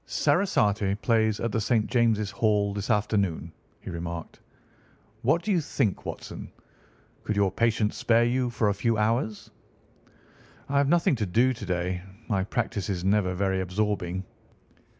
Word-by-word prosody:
"Sarasate 105 - +1
plays 110 -2 +2
at 115 - -1
the 110 - 0
St. 110 0 +2
James's 110 -5 +1
Hall 105 -1 +1
this 100 +2 -4
afternoon," 100 -6 0 0.3
he - - -7
remarked. 85 -1 -6 0.8
"What 155 +8 +2
do 215 - -1
you 180 -4 +3
think, 125 -8 -1
Watson? - - -7 0.7
Could 110 - -2
your 100 -2 +2
patients 110 0 +1
spare 120 -1 +3
you 125 +1 +1
for 115 -2 0
a - - +1
few 115 +3 0
hours?" 110 0 -1 1.2
"I 140 0 +2
have 140 -1 +2
nothing 170 -3 +3
to 105 -3 -1
do 120 +8 +3
to 115 -4 -8
day. 90 0 -1 0.3
My 95 -4 +1
practice 110 -2 -2
is 90 -3 -2
never 95 -2 +2
very 95 0 0
absorbing." 95 -1 -2
105 Hz, 150 wpm, -27 LUFS, 95-120 Hz, 1.2 s, you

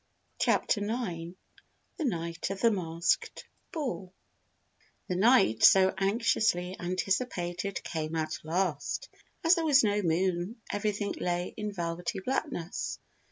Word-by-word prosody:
CHAPTER 205 - +2
NINE 185 -6 -3 0.6
THE 320 - -2
NIGHT 170 -7 -2
OF 195 0 -4
THE 230 - +5
MASKED 170 -4 -1 0.3
BALL 240 - -4 1.0
The 180 - -1
night 205 - +4
so 190 -1 +7
anxiously 195 -2 +1
anticipated 185 0 -2
came 160 0 -3
at 160 0 -2
last. 165 -1 -1 0.3
As 330 +1 +6
there 335 -3 +1
was 285 -4 +6
no 205 -1 +2
moon 180 +4 0
everything 205 0 -1
lay 175 0 -1
in 210 -1 -3
velvety 175 -1 -3
blackness. 225 - -3
190 Hz, 115 wpm, -30 LUFS, 170-215 Hz, 1.0 s, so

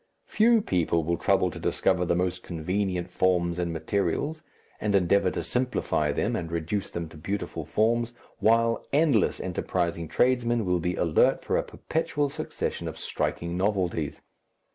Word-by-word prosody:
Few 225 0 +4
people 85 - +1
will 85 +2 0
trouble - - +2
to - - -8
discover 90 0 +1
the 85 - +1
most 90 0 -1
convenient 90 +2 -2
forms 90 -1 +1
and 85 -1 -1
materials, 100 - -1 0.4
and 105 -1 0
endeavour 95 0 +3
to - - -3
simplify 125 - 0
them 110 +10 0
and 85 -5 -4
reduce 85 +5 -2
them 85 -1 -4
to 80 - -13
beautiful 100 +6 -4
forms, 115 +2 +1 0.3
while 115 +1 +3
endless 140 - +3
enterprising 85 -2 -2
tradesmen 120 +3 +2
will 90 -1 +1
be 90 +2 -1
alert 85 -3 +3
for - - 0
a - - +3
perpetual 150 -3 -2
succession 155 +1 -4
of - - -6
striking 85 0 -2
novelties. 90 -6 -1
95 Hz, 150 wpm, -27 LUFS, 85-115 Hz, 0.4 s, Few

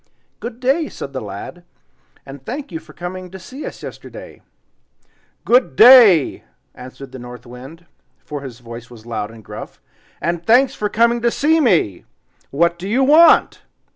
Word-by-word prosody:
"Good 235 0 -8
day!" 270 +5 0
said 140 - -9
the 130 - -4
lad, 105 - -9 0.6
and 135 0 -11
"thank 270 - -7
you 165 - -5
for - - -17
coming 180 +1 -8
to 190 - -10
see 255 - -9
us - - -10
yesterday." - - -11 1.0
"GOOD 245 - +2
DAY!" 220 - +7 0.3
answered 130 +1 -12
the 130 - -10
North 125 -1 -11
Wind, 130 +8 -12 0.4
for 145 -2 -6
his 125 -3 -10
voice 120 0 -10
was 115 -2 -15
loud 115 -3 -4
and 110 -2 -15
gruff, - - -10 0.4
"AND 170 0 -3
THANKS 250 +4 +4
FOR 210 - -3
COMING 235 +2 +2
TO 235 - +2
SEE 310 +6 +1
ME. 175 - +1 0.4
WHAT 170 +4 0
DO 190 +3 -6
YOU 255 +5 +2
WANT?" 315 +5 +5
175 Hz, 165 wpm, -18 LUFS, -, 1.0 s, DAY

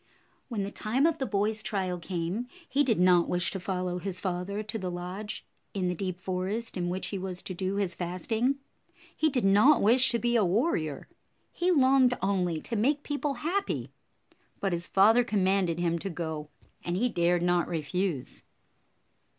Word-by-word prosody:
When 225 -6 -2
the 200 - -4
time 250 +7 0
of 325 -1 +2
the 265 - -1
boy's 210 +1 0
trial 185 -4 -2
came, 180 +7 -3 0.2
he 285 +1 +2
did 230 -8 +1
not 180 -1 +5
wish 175 -1 0
to 190 - -4
follow 180 -1 -2
his 185 0 -4
father 190 +3 -3
to 215 +1 -4
the 185 -2 -3
lodge 180 +4 -6 0.3
in 185 -2 0
the - - 0
deep 180 0 -4
forest 190 +5 -3
in 175 -2 -1
which 185 +2 -3
he 200 - -3
was 185 -1 -5
to 185 - -5
do 190 +2 -2
his 195 -3 0
fasting. 200 +10 -1 0.6
He 315 - +2
did 255 -7 0
not 210 +10 +6
wish 245 +5 +5
to 235 - +2
be 240 +1 0
a 225 - +4
warrior. 180 - 0 0.4
He 350 +1 0
longed 265 -5 +4
only 180 -4 0
to 235 - -5
make 280 +7 +1
people 290 -1 -2
happy. 395 +4 -1 0.7
But 195 -2 0
his 170 0 -3
father 220 +5 +5
com 210 -4 0
manded 185 -3 +2
him 170 -1 0
to 195 - -4
go, 160 -3 -5 0.3
and 175 +1 -2
he 245 +5 +2
dared 175 -4 +1
not 175 -1 +2
refuse. 170 -2 -2
195 Hz, 185 wpm, -29 LUFS, 180-230 Hz, 0.7 s, not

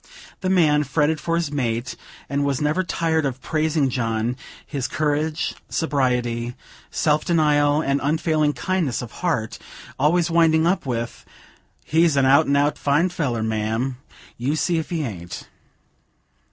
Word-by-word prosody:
The 185 - -2
man 155 -5 +4
fretted 150 +2 0
for 165 - 0
his 170 -4 -1
mate, 125 -3 -2 0.3
and 140 0 -1
was 140 -2 0
never 150 +4 +1
tired 165 -3 0
of 130 -2 -2
praising 155 0 0
John 115 0 -1 0.3
his 135 -4 -3
courage, 150 +2 -1 0.2
sobriety, 125 -5 0 0.3
self 150 0 +1
denial, 150 -3 +3
and 140 +1 0
unfailing 155 0 +1
kindliness 180 -11 -1
of 120 - -8
heart; 140 - -1 0.4
always 170 +4 +2
winding 165 -1 +4
up 175 -4 +1
with: 115 -1 -3 0.6
"He's 160 -1 +3
an 135 - +4
out 135 +2 +5
an' 140 - +2
out 145 +1 +1
fine 150 +6 +2
feller, 130 -10 -2
ma'am; 110 +4 -1 0.4
you 135 +5 0
see 165 +1 +1
if 160 - -5
he 165 -3 -1
aint." 90 -9 -7
145 Hz, 145 wpm, -22 LUFS, 125-160 Hz, 0.6 s, out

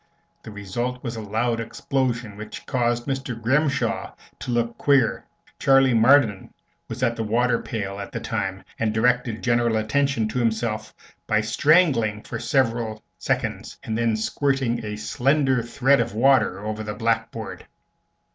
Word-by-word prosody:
The - - -10
result 120 +5 -4
was 120 -2 -4
a 110 - -5
loud 115 +3 -1
explosion, 120 -1 -2
which 105 +1 -9
caused 120 -2 0
Mr. 135 -3 -3
Grimshaw 130 -1 0 0.2
to - - -7
look 120 -1 0
queer. 135 -5 +2 0.3
Charley 135 -1 +4
Marden 115 -3 +4 0.4
was - - -5
at 115 - +2
the 115 - -3
water 120 +2 +1
pail, 100 -4 -4
at 100 - -7
the - - -4
time, 95 0 -3 0.2
and 110 -1 0
directed 120 -1 +1
general 120 -1 +2
attention 115 +1 +1
to 125 - -2
himself 110 -1 -1 0.4
by 110 0 +2
strangling 115 -3 +3
for 120 - -6
several 115 -3 0 0.2
seconds - - -2
and 110 - -3
then 115 -1 +1
squirting 130 0 0
a 105 -1 -4
slender 130 +4 +1
thread 135 +4 +2
of - - -1
water 115 -6 +3
over 110 0 -3
the 105 -1 -5
blackboard. 115 0 -2
115 Hz, 145 wpm, -23 LUFS, 110-130 Hz, 0.4 s, Charley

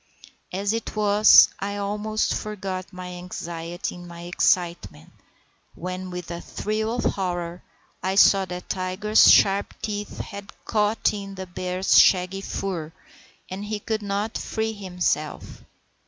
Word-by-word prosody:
As 200 +3 -1
it 225 -1 -4
was, 210 0 +7
I 200 +1 -3
almost 210 +2 -1
forgot 190 -3 -5
my 180 -1 -8
anxiety 175 -1 -5
in 175 0 -10
my 170 0 -10
excitement, 170 - 0 0.6
when, 185 +1 -5
with 180 -1 -6
a 170 0 -5
thrill 220 +2 -2
of 245 - -2
horror, 175 -2 -2 0.4
I 190 +1 -1
saw 195 -1 +6
that 180 0 -7
Tiger's 190 +3 +3
sharp 195 0 +4
teeth 205 -1 -4
had 200 0 -8
caught 210 0 +1
in 195 -1 -6
the 190 0 -6
bear's 185 +1 +2
shaggy 185 +1 +4
fur, 180 -6 -4 0.6
and 195 +2 -6
he 210 0 -3
could 215 +1 -2
not 205 +2 -2
free 220 0 -2
himself. 180 -6 -3
190 Hz, 135 wpm, -24 LUFS, 180-205 Hz, 0.6 s, was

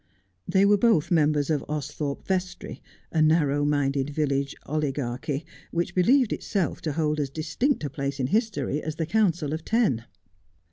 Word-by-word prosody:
They 190 +2 +4
were 205 0 +4
both 185 -8 +3
members 150 -2 +2
of 150 - 0
Austhorpe 150 -1 -4
Vestry, 185 -1 -3 0.3
a 160 - +2
narrow 150 -2 +3
minded 145 -1 +1
village 140 -2 -1
oligarchy, 145 0 -2 0.2
which 170 +1 -2
believed 240 +6 +4
itself 195 -5 -2
to 155 -3 -2
hold 155 -1 0
as 140 -2 -1
distinct 160 - -1
a 145 - -2
place 140 -1 -3
in 130 - +1
history 155 - 0
as 155 -1 -4
the 160 0 -2
Council 170 -6 +1
of 160 0 -4
Ten. 205 - +1
155 Hz, 155 wpm, -26 LUFS, 145-175 Hz, 0.3 s, They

